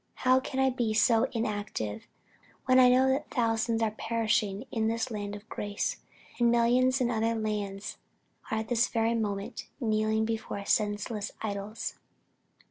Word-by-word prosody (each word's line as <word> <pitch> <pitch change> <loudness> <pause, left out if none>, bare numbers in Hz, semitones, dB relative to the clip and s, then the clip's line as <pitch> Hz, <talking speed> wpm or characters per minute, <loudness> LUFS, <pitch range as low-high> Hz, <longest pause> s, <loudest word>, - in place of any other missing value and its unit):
How 255 +1 +6
can 265 0 -4
I 265 0 +4
be 235 -4 -1
so 225 0 +4
inactive, 205 - -3 0.6
when 255 0 +5
I 250 -1 +8
know 255 +1 +5
that 275 +3 0
thousands 225 -2 +1
are 220 - +1
perishing 220 -1 0
in 220 -1 0
this 230 +2 -1
land 205 -1 -4
of 205 +1 -11
grace; 205 -2 -3 0.4
and 240 -1 +4
millions 250 +3 +3
in 245 -1 +2
other 225 0 +1
lands 210 -2 -3 0.5
are 220 - 0
at 220 0 -3
this 240 +1 +3
very 230 0 +1
moment 205 -3 -3
kneeling 220 -2 +1
before 220 -3 -4
senseless 210 0 0
idols!" 205 +1 -4
225 Hz, 150 wpm, -29 LUFS, 210-240 Hz, 0.6 s, I